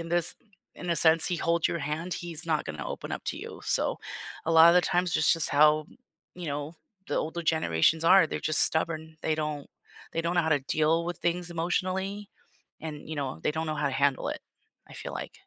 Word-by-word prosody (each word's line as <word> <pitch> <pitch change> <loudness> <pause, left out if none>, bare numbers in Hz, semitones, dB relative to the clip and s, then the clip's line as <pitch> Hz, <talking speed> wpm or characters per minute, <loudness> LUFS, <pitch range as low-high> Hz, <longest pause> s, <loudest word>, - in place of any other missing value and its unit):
in 165 - -6
this 175 -1 +1 0.4
in 180 - -5
a 170 - +1
sense, 160 0 +5
he 180 - -1
holds 170 0 +1
your 170 - -2
hand, 155 +5 -3
he's 170 -1 -6
not 155 -2 0
gonna 75 -2 -5
open - - -6
up - - -5
to - - -3
you. - - -8
So - - 0 0.5
a 165 - +1
lot 165 +1 +9
of 170 - +6
the 180 - +5
times, 175 -1 0
that's - - +4
just 165 -2 -1
how, 150 +1 +5 0.5
you 180 -1 -7
know, 145 +2 -4 0.3
the - - -1
older 160 +2 -2
generations 160 - +2
are. 185 0 +7
They're - - -4
just 155 - +2
stubborn. 160 0 -1
They 155 - +1
don't 150 -2 -4 0.4
they 165 - 0
don't 170 +1 -1
know 175 - +4
how 160 - -1
to 145 -2 +3
deal 155 +4 +1
with 175 +1 -4
things 175 0 -1
emotionally, 185 +4 -2 0.5
and, 150 -2 -7
you 155 - -5
know, 135 -2 -3
they - - +1
don't 160 +1 -2
know 155 - -2
how 145 0 0
to 140 - -1
handle 140 0 +1
it, - - -3 0.5
I - - -14
feel - - -7
like. - - -6
160 Hz, 225 wpm, -28 LUFS, 150-170 Hz, 0.5 s, lot